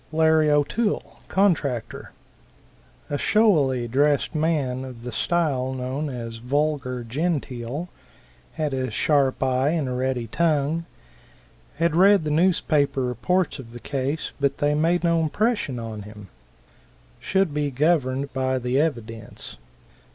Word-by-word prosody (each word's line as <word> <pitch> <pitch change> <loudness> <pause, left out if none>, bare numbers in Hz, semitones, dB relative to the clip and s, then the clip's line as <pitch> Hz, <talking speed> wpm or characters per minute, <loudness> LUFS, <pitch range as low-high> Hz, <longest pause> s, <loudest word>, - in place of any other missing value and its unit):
Larry 160 -1 +4
O'Toole, 150 +10 0
contractor. 150 - 0 1.0
A 145 - -1
showily 145 - +3
dressed 140 +4 +2
man 150 -5 0
of 125 -3 -9
the 125 - -5
style 135 -2 0
known 130 +4 -3
as 115 -3 -6
"vulgar 130 0 -1
genteel," 140 +1 -3 0.7
had 150 -3 -2
a 130 -1 -1
sharp 135 +3 +1
eye 130 +1 +2
and 155 -4 0
a - - -3
ready 125 -1 -1
tongue. 155 +5 0 0.9
Had 165 +1 +1
read 195 +1 +6
the 150 - -2
newspaper 150 -5 +2
reports 160 +7 0
of 115 -3 -10
the 120 - -8
case, 140 +4 -3
but 140 0 +1
they 145 0 +1
made 165 +4 +1
no 170 -1 +3
impression 205 - 0
on 110 -2 -6
him. 105 -1 -11 0.9
Should 190 -5 +1
be 150 -1 0
governed 140 -1 +1
by 130 0 0
the 125 +1 0
evidence. 115 - -4
140 Hz, 130 wpm, -24 LUFS, 125-160 Hz, 1.0 s, read